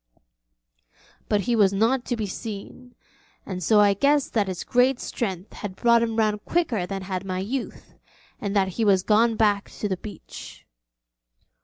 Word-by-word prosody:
But 205 -1 +2
he 240 +3 0
was 200 -4 +4
not 230 +6 +1
to 245 - -1
be 220 -2 -2
seen, 220 +5 -8 0.5
and 185 -2 -5
so 210 +5 +4
I 205 -1 +5
guessed 280 +7 +2
that 210 -4 +1
his 185 -2 -4
great 250 +1 +2
strength 190 -4 -4
had 200 -3 -6
brought 235 +2 +4
him 225 -1 -1
round 215 -2 +1
quicker 245 - 0
than 195 0 -4
had 185 -1 -4
my 185 -1 -3
youth, 235 +8 -5 0.5
and 200 0 -3
that 190 -2 +3
he 205 +5 -2
was 195 -3 +4
gone 225 +2 +3
back 205 -2 +2
to 210 - -4
the 190 -2 -2
beach. 210 +3 -10
210 Hz, 170 wpm, -24 LUFS, 195-235 Hz, 0.5 s, I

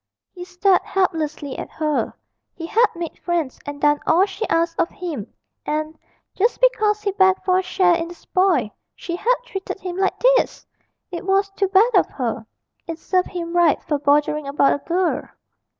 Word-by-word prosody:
He 355 -1 -8
stared 365 +1 +2
helplessly 310 -7 -2
at - - -6
her; 305 -2 -1 0.4
he 330 - -6
had 455 +7 +3
made 335 -1 -6
friends 335 -7 -2
and 290 0 -6
done 295 0 +3
all 360 +4 +5
she 415 +2 -5
asked 330 0 0
of 330 - +2
him, 305 - -6 0.3
and, 310 +1 -3 0.4
just 455 +5 +1
because 425 -4 +2
he 405 - 0
begged 380 -1 +3
for 370 0 +3
a - - +1
share 370 -1 +2
in 335 0 -1
the 345 - -10
spoil, 355 - +1 0.2
she 340 - -5
had 480 +8 +2
treated 385 -5 -6
him 360 -1 -5
like 385 0 0 0.2
this! - - -2 0.5
It 345 - -5
was 390 +1 +1
too 390 0 0
bad 405 +6 +4
of 375 - +4
her 230 -3 -4 0.4
it 330 -1 -5
served 365 +2 0
him 345 -1 -5
right 340 -4 +4
for 295 -3 -1
bothering 295 +1 +1
about 280 0 +3
a - - -2
girl. 350 +1 0
350 Hz, 180 wpm, -21 LUFS, 310-385 Hz, 0.5 s, all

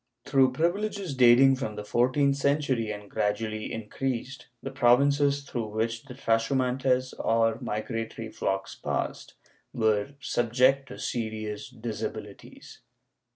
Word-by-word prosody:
Through 135 -2 +3
privileges 185 +3 -1
dating 130 +1 +6
from 110 -5 -4
the 105 - -5
fourteenth 130 +5 +2
century 140 -5 0
and 105 -1 -6
gradually 110 +2 -2
increased, 125 +3 -4 0.2
the 135 - -4
provinces, 140 +2 +3
through 120 -5 -4
which 115 +3 -2
the 125 -3 -10
trashu 115 +4 +1
iimntcs 130 0 +1
or 115 0 +2
migratory 115 -1 -4
flocks 95 0 -2
passed, - - -4 0.4
were 110 +3 +1
subjected 130 +2 +2
to - - -9
serious 110 -2 -4
disabilities. 110 -1 -7
120 Hz, 115 wpm, -27 LUFS, 110-135 Hz, 0.4 s, dating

